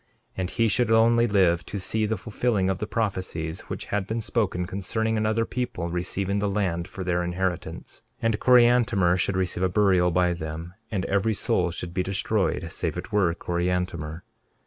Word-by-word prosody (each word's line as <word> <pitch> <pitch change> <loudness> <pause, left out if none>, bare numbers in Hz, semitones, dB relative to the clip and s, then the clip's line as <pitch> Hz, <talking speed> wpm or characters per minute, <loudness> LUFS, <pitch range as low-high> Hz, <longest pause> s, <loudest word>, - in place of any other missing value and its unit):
And 90 -1 -2
he 115 +2 +1
should 120 +1 +2
only 115 +1 +4
live 90 -5 +3
to 100 - -4
see 110 +3 0
the 110 0 -1
fulfilling 110 -4 0
of 95 - -3
the 105 - -3
prophecies 95 -7 -2
which - - -4
had 105 -1 0
been 110 +1 -2
spoken 105 -5 -1
concerning 110 +5 -2
another 110 +1 +1
people 115 -10 -3
receiving 95 +3 -1
the 100 0 0
land 95 -4 -1
for 100 -3 -7
their 90 -1 0
inheritance; 90 0 -3 0.2
and 115 -2 0
Coriantumr 120 -7 +4
should 95 +1 +1
receive 90 -1 0
a 95 - +3
burial 95 -2 +3
by 90 +1 +2
them; 80 +1 -6 0.2
and 100 -4 -2
every 100 +3 +1
soul - - +1
should 85 0 -5
be 90 - 0
destroyed 95 -3 -1
save 85 -1 -3
it 90 +6 -6
were 100 -5 +3
Coriantumr. 85 -2 -2
95 Hz, 175 wpm, -25 LUFS, 90-110 Hz, 0.2 s, only